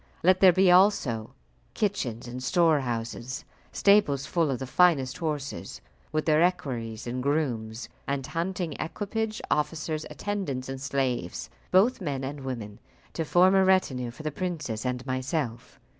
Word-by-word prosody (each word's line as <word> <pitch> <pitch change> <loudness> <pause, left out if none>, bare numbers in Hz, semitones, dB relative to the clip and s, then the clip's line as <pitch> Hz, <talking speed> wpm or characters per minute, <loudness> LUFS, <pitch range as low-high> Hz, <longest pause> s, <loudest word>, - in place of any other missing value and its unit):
Let 185 +2 +5
there 185 -1 +8
be 185 +1 +4
also 180 - +3 0.4
kitchens 130 - -2
and 125 +1 -6
storehouses, 130 -6 0 0.3
stables 175 -10 +3
full 165 -1 +1
of 135 - 0
the 130 - -5
finest 135 -3 +3
horses, 150 -4 -4 0.3
with 155 -1 -1
their 155 0 +4
equerries 120 -11 -1
and 125 +1 -3
grooms, 125 -6 -1 0.2
and 140 -2 -1
hunting 170 0 -2
equipage, 215 +5 -3
officers, 155 +1 -1
attendants, 165 -12 -3
and 135 0 -5
slaves, 130 -9 -2 0.2
both 200 +6 +4
men 140 -6 -3
and 140 +2 -4
women, 115 -6 -6 0.3
to 165 - -1
form 180 +4 +4
a 190 0 +5
retinue 145 -10 +2
for 125 +6 -10
the 155 - -2
princess 150 -9 -3
and 125 0 -3
myself. 130 -2 -3
145 Hz, 145 wpm, -27 LUFS, 125-180 Hz, 0.4 s, there